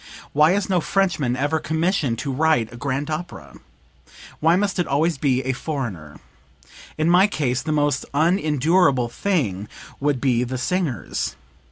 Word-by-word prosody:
Why 150 +4 +5
is 200 0 0
no 185 -3 +1
Frenchman 165 -10 0
ever 145 +5 0
commissioned 160 -6 0
to 135 +3 -3
write 145 -6 +1
a - - -9
grand 140 +4 -3
opera? 155 - -6 0.8
Why 165 +2 +4
must 195 0 0
it 175 - 0
always 150 +2 +1
be 130 -2 +1
a 130 - 0
foreigner? 115 - -5 0.8
In 155 +1 +1
my 180 +3 +5
case 130 -10 -1
the 155 - -3
most 145 -3 0
unendurable 155 -4 +2
thing 115 - -1 0.3
would 140 -2 0
be 125 -2 +1
the 130 +1 -3
singers. 150 - -2
145 Hz, 150 wpm, -22 LUFS, 125-170 Hz, 0.8 s, Why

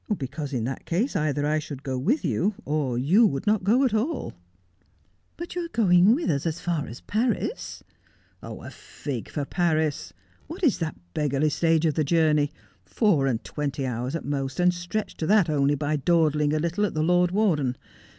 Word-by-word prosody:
' - - -3
Because 140 +2 -5
in 125 -5 -2
that 130 +3 -5
case 210 +11 0
either 145 -1 0
I 155 +1 +1
should 145 -2 -8
go 135 -2 -3
with 210 - 0
you, 200 +3 0
or 145 -5 -1
you 185 - +4
would 140 -8 -3
not 210 -2 +2
go 230 +8 +3
at 245 - 0
all.' 255 +8 -1 0.5
' 95 0 -40
But 345 +1 -6
you 355 - -2
are - - -4
going 195 - +4
with 325 +2 -2
us 140 +2 -1
as 165 +2 -3
far 170 -4 -2
as 120 - -9
Paris.' 240 - -2 0.3
' - - -37
A - - -8
fig 130 -6 -7
for 145 -2 -3
Paris. 155 - 0 0.4
What 350 +4 -8
is 275 - +3
that 160 -2 -3 0.2
beggarly 150 0 +1
stage 165 0 +2
of 155 - +2
the 155 - +1
journey? 150 -1 +2 0.3
Four 175 - +2
and 120 -4 -1
twenty 140 -2 -3
hours 125 +3 -3
at 165 - -4
most, 135 0 -3
and 180 0 +4
stretched 180 +5 -4
to 160 - -1
that 200 -6 +4
only 145 -1 +2
by 150 +1 -1
dawdling 150 -1 +2
a - - +2
little 170 +6 -1
at 205 - -1
the 155 - +1
Lord 180 +1 +3
Warden. 165 - +1
155 Hz, 200 wpm, -25 LUFS, 140-190 Hz, 0.5 s, you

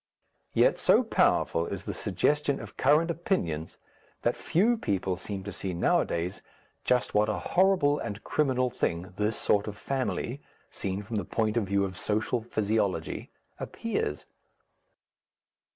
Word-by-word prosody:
Yet - - +4
so - - +5
powerful 85 0 +2
is 95 -2 -5
the - - -3
suggestion 140 +9 0
of - - -9
current 155 +5 +3
opinions 85 - -2 0.5
that 120 - +2
few 210 +9 +2
people 95 - -1
seem 95 +2 -6
to 100 0 -6
see 95 -1 -3
nowadays 85 +1 0 0.4
just 125 -1 +1
what 105 +1 +3
a - - 0 0.2
horrible 180 -6 +4
and 100 +2 -5
criminal 130 -4 +1
thing 90 +1 -2
this 105 +1 0
sort 100 0 +1
of 105 -1 -5
family, 135 +1 -2 0.3
seen 95 +1 -3
from 110 +2 -4
the 100 - -1
point 110 -1 -1
of 115 -4 +1
view 100 0 +2
of 95 -1 -6
social 110 +3 0
physiology, 110 -3 -1 0.3
appears. 430 - -3
110 Hz, 140 wpm, -28 LUFS, 95-140 Hz, 0.5 s, so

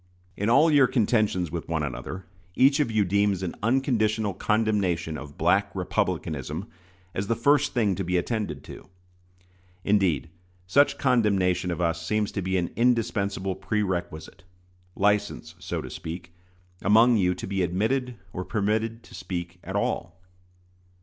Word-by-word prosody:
In 100 +4 -1
all 145 +7 +5
your 140 -3 +6
contentions 105 - +1
with 85 -1 -5
one 80 -2 0
another, 90 +7 -5 0.3
each 135 +3 +5
of 145 - +2
you 110 -2 +2
deems 100 0 +1
an 90 - -3
unconditional 110 -4 +1
condemnation 100 -6 0
of 70 0 -9
"Black - - +2
Republicanism" 70 -5 -2 0.5
as 95 +1 -3
the 115 - +1
first 140 +4 +2
thing 110 -5 +2
to 95 - -3
be 90 +1 0
attended 90 - -2
to. - - -11 0.9
Indeed, 90 -8 +1 0.3
such 140 +10 +3
condemnation 95 -8 +2
of 90 0 -2
us 85 -1 0
seems 105 +3 0
to 100 - -3
be 95 +1 0
an 85 -1 -1
indispensable 105 -5 +1
prerequisite 95 -3 -3 0.5
license, 105 -9 0
so - - -4
to - - -7
speak 85 +2 -7 0.5
among 115 +4 +5
you 90 -2 +2
to - - -6
be 95 0 -2
admitted 115 +9 0 0.2
or 90 - -3
permitted 110 +3 -1
to - - -16
speak 90 -1 -5
at - - -6
all. 85 +2 -2
100 Hz, 145 wpm, -26 LUFS, 90-110 Hz, 0.9 s, your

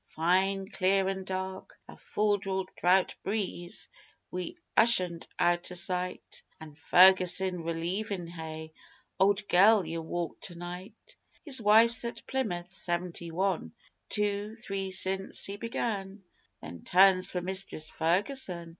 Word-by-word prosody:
Fine, 190 +4 0
clear 190 0 +1
an' 190 -1 -3
dark 190 0 -6
a - - -12
full 210 -1 0
draught 190 -1 0
breeze, 190 -4 -4 0.4
wi' 180 - -5 0.2
Ushant 185 -8 +3
out 175 +1 +1
o' - - -7
sight, 180 0 -1 0.2
An' 155 -2 -11
Ferguson 185 +2 +4
relievin' 175 +4 -3
Hay. 160 -2 -8 0.5
Old 200 +1 +2
girl, 200 +2 +5
ye'll 165 +1 -4
walk 170 +1 -5
to 175 - -3
night! 180 - -10 0.3
His 270 -5 +3
wife's 225 +3 +5
at 235 0 -6
Plymouth.... 180 -10 -3
Seventy 175 -2 -3
One 175 - -2 0.4
Two 210 +1 -2
Three 195 -4 -5
since 190 +1 0
he 200 +1 -4
began 205 -4 -4 0.4
Three 85 - -9
turns 185 - +4
for 180 - -3
Mistress 185 -4 -1
Ferguson 175 0 0
190 Hz, 125 wpm, -29 LUFS, 175-200 Hz, 0.5 s, girl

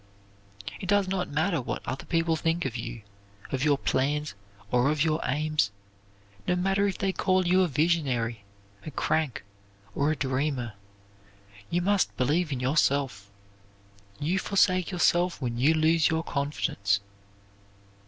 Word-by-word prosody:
It 185 - -6
does 205 -1 +3
not 185 -1 -2
matter 160 +2 0
what - - -5
other 130 +2 -4
people 165 -1 +1
think 165 +1 0
of 125 -3 -3
you, 115 -1 -6 0.5
of 135 -1 -1
your 145 -2 +3
plans, 145 +3 0 0.4
or 125 +2 +3
of 150 0 +1
your 160 -1 +1
aims. 150 -6 +1 0.8
No 180 - +2
matter 195 +2 +1
if 195 - -2
they 195 -1 0
call 185 -1 +1
you 185 +2 +4
a 185 - +3
visionary, 135 -8 0 0.4
a - - -6
crank, 150 -3 -1 0.5
or 140 +6 +1
a - - 0
dreamer; 130 -3 -1 1.0
you 175 +1 0
must 200 0 +1
believe 150 +6 +1
in 130 - -2
yourself. 130 -6 +1 0.9
You 175 +6 0
forsake 185 -2 +2
yourself 175 -1 +2
when 120 -3 -3
you 150 +6 +4
lose 160 +1 +3
your 160 0 0
confidence. 125 -9 -1
155 Hz, 145 wpm, -27 LUFS, 130-175 Hz, 1.0 s, you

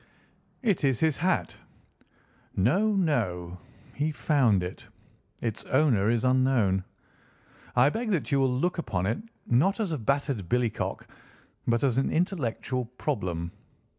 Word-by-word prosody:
"It 205 -10 +1
is 135 -4 +2
his 160 -3 +2
hat." 180 +3 0 1.0
"No, 195 - +2
no, 90 - -1 0.3
he 150 +2 -1
found 130 - +2
it. 90 - -7 0.5
Its 115 -3 -2
owner 130 -8 +3
is 115 +1 +1
unknown. 125 -7 +3 0.9
I 125 +3 +6
beg 225 +8 -3
that 180 -8 -1
you 140 - +3
will 135 -1 +3
look 170 +8 0
upon 100 - -1
it 110 +4 0 0.3
not 150 - +2
as 205 -6 -1
a 155 - -2
battered 135 - -1
billycock 120 -3 -1 0.6
but 115 +1 +2
as 130 -2 +2
an 135 - +1
intellectual 130 - -1
problem. 95 - -3
130 Hz, 135 wpm, -27 LUFS, 110-155 Hz, 1.0 s, I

